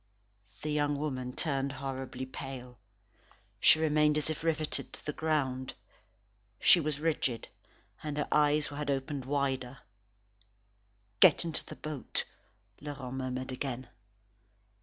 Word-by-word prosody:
The 155 - -1
young 145 -1 +2
woman 130 -4 -2
turned 135 -1 -1
horribly 130 -1 -4
pale. 130 -2 -7 0.8
She - - +7
remained 150 -1 +3
as 150 +1 +1
if 155 - -5
riveted 155 -2 0
to - - -10
the 150 - -2
ground. 135 -5 0 0.8
She - - +7
was 155 -2 -1
rigid, 150 -7 0 0.5
and 150 -1 -4
her 150 - 0
eyes 150 0 +4
had 145 0 -4
opened 135 0 -1
wider. 135 -2 -1 1.4
"Get - - +7
into 165 -2 -2
the - - -9
boat," 155 -4 -3 0.6
Laurent 140 -3 -5
murmured 130 0 -3
again. 130 -1 -4
140 Hz, 120 wpm, -32 LUFS, 130-150 Hz, 1.4 s, She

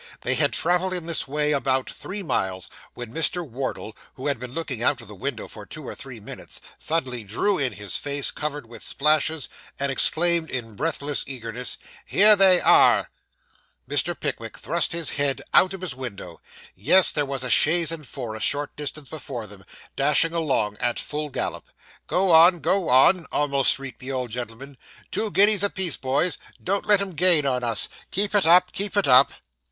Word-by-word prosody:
They 130 - -1
had 140 +2 +2
travelled 180 +2 0
in 175 -3 -5
this 165 -4 -1
way 150 +2 -1
about 135 -2 0
three 200 +1 -7
miles, 95 - -3 0.2
when 120 -1 -8
Mr. 165 +2 0
Wardle, 125 -3 -5 0.2
who 130 - -9
had 140 -5 -1
been 125 0 -8
looking 135 -5 -5
out 130 +2 +1
of 115 - -9
the 105 - -10
Window 120 +3 -5
for 105 - -10
two 155 +6 -9
or - - -5
three 130 -4 -10
minutes, 105 - -10 0.2
suddenly 130 -8 -2
drew 155 - -1
in 135 -3 0
his 100 -2 -3
face, 145 -1 0
covered 150 -2 -5
with 115 -1 -12
splashes, 155 0 +1 0.3
and 140 0 -1
exclaimed 170 +4 +3
in 115 -4 -6
breathless 145 +1 -2
eagerness 125 -1 -4 0.3
'Here 210 +2 +6
they 190 -2 +5
are!' - - +5 0.8
Mr. 145 +5 0
Pickwick 115 -6 -5
thrust 170 +2 -1
his 165 -3 -1
head 140 -2 -1
out 185 - +5
of 195 -1 -7
his 180 -7 -4
window. 100 -9 -8 0.3
Yes: 175 - +5
there 145 - 0
was 135 -2 -4
a 125 - -3
chaise 165 +6 +3
and 165 -2 -6
four, 120 -5 -6
a 110 - -7
short 145 +5 -1
distance 150 0 -6
before 135 -6 -7
them, 100 -2 -12 0.3
dashing 150 +4 +2
along 130 -11 -1
at 120 - -1
full 150 0 -4
gallop. - - -5 0.4
'Go 185 0 +1
on, 170 +2 +6
go 175 +4 0
on,' 160 +8 +4
almost 140 -2 +2
shrieked 135 -1 -9
the 130 +1 -6
old 125 -3 -4
gentleman. 125 +4 -8 0.3
'Two 220 - -2
guineas 205 0 +4
a 205 - +3
piece, 185 -7 +1
boys 140 +7 -1 0.2
don't 195 +2 -2
let 205 -1 +4
'em 200 -1 -4
gain 165 -2 +4
on 125 -2 -1
us 115 -2 +1 0.2
keep 200 +2 0
it 200 -5 +2
up 180 +2 +5
keep 205 +1 -3
it 200 - +2
up. 130 +1 +6
145 Hz, 190 wpm, -23 LUFS, 125-170 Hz, 0.8 s, Here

